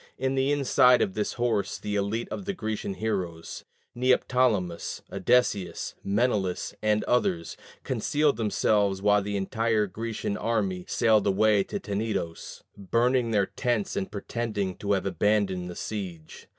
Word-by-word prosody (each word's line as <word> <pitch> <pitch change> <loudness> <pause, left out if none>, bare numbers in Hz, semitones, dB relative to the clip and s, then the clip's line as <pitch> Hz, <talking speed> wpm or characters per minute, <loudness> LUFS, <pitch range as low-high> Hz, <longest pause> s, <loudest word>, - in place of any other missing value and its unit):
In 130 +1 0
the 135 +1 +1
inside 125 -3 +5
of 95 - -2
this 105 0 -2
horse 115 -5 0
the 105 0 -4
elite 105 +3 -1
of 195 - -5
the 200 0 -3
Grecian 110 - -3
heroes, 90 -6 -4 0.3
Neoptolemus, 125 -7 +1
Odysseus, 105 -8 +1
Menelaus, 100 -3 0
and 105 0 +2
others, 90 -9 0 0.3
concealed 150 -2 +1
themselves 105 -3 +1
while 105 +1 +3
the 100 0 -3
entire 110 +2 +1
Grecian 105 +1 -4
army 100 -6 -1
sailed 110 -3 +3
away 105 +1 +3
to 205 - -4
Tenedos, 100 - -4
burning 120 +4 +1
their 105 -3 +2
tents 120 -1 -2
and 95 - -3
pretending 105 -3 -3
to 100 0 0
have 95 -1 0
abandoned 95 -1 +1
the 90 - -7
siege. 90 -7 -6
105 Hz, 135 wpm, -27 LUFS, 95-115 Hz, 0.3 s, inside